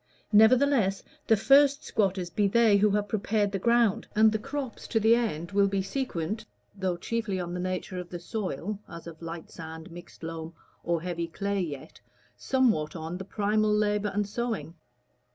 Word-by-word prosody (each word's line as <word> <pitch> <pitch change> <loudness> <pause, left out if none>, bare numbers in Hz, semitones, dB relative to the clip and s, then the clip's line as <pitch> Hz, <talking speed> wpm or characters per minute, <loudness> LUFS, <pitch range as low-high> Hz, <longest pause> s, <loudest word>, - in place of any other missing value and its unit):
Nevertheless 220 -2 +4 0.2
the 220 - +5
first 280 +5 +5
squatters 190 -4 0
be 205 +3 +2
they 220 0 +4
who 210 +1 +4
have 205 0 0
prepared 210 -1 0
the 195 - -2
ground, 235 0 +2
and 215 +1 +6
the 220 - -1
crops 270 +2 -5
to 225 - +1
the 220 +1 +5
end 200 -8 -1
will 200 0 +4
be 195 -1 -1
sequent 205 - -3 0.3
(though 190 -3 -1
chiefly 210 0 -2
on 175 -1 -4
the 180 - -3
nature 185 0 -3
of 180 -1 -7
the 175 - -5
soil, 200 - -4
as 170 -1 -9
of 165 -1 -10
light 165 0 -7
sand, 160 0 -9
mixed 175 0 -12
loam, 165 0 -6 0.3
or 170 -1 -1
heavy 170 -2 -3
clay, 200 +3 -2
yet) 145 -6 -7 0.3
somewhat 225 - +1
on 165 +2 -5
the - - -5
primal 210 +1 +1
labor 210 0 +1
and 205 0 -1
sowing. 210 -8 -3
200 Hz, 175 wpm, -28 LUFS, 175-220 Hz, 0.3 s, and